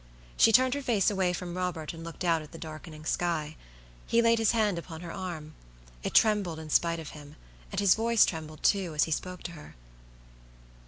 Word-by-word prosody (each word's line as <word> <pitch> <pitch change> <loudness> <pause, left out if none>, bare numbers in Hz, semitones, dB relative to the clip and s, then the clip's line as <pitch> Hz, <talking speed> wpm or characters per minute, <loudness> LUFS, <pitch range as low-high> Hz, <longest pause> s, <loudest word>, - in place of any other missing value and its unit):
She 225 - +6
turned 255 +2 +5
her 285 - -2
face 220 -7 +2
away 190 -3 +1
from 180 -1 -5
Robert, 180 -4 -3
and 165 0 -9
looked 170 +2 -7
out 165 -2 +2
at 150 - -12
the 165 - -9
darkening 155 -1 -9
sky. 160 -3 -1 0.5
He 230 - +3
laid 230 0 +4
his 225 - +3
hand 210 -6 +2
upon 165 -1 -9
her 170 -1 -7
arm. 170 -5 -6 0.5
It - - -4
trembled 205 -7 +3
in 160 -1 -8
spite 170 +1 +2
of 160 - -7
him, 145 0 -12 0.4
and 195 - -2
his 200 -2 +5
voice 230 0 +4
trembled, 155 -2 -6
too, 185 -6 +2
as 150 - +4
he 160 - -3
spoke 180 +3 -3
to 175 - -5
her. 150 -3 -12
175 Hz, 205 wpm, -29 LUFS, 160-200 Hz, 0.5 s, She